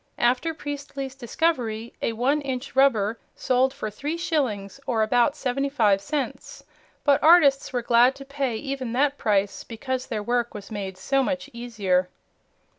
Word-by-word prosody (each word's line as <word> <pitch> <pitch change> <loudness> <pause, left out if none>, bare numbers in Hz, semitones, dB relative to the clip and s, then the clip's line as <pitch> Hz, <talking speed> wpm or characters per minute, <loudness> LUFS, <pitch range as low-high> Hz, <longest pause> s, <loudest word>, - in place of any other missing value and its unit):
After 255 +7 +1
Priestley's 280 -2 -6
discovery, 240 -4 -1
a 230 - 0
one 265 +6 +1
inch 265 -1 -5
"rubber" 230 -5 +3 0.2
sold 255 +1 +2
for 260 -6 -5
three 295 +10 -4
shillings, 265 - -2
or 225 -3 +2
about 245 +5 +2
seventy 275 0 -1
five 210 -8 +3
cents, 295 - -4 0.4
but 285 -2 +4
artists 305 -4 +5
were 245 -2 -2
glad 240 +2 +5
to 275 - -10
pay 275 -3 -2
even 260 -1 -4
that 280 +2 +1
price, 200 -2 0
because 255 +2 -4
their 215 -3 -3
work 240 0 -1
was 205 +1 -9
made 195 -3 -5
so 275 +7 +1
much 270 +1 -2
easier. 205 -7 0
255 Hz, 155 wpm, -25 LUFS, 220-280 Hz, 0.4 s, artists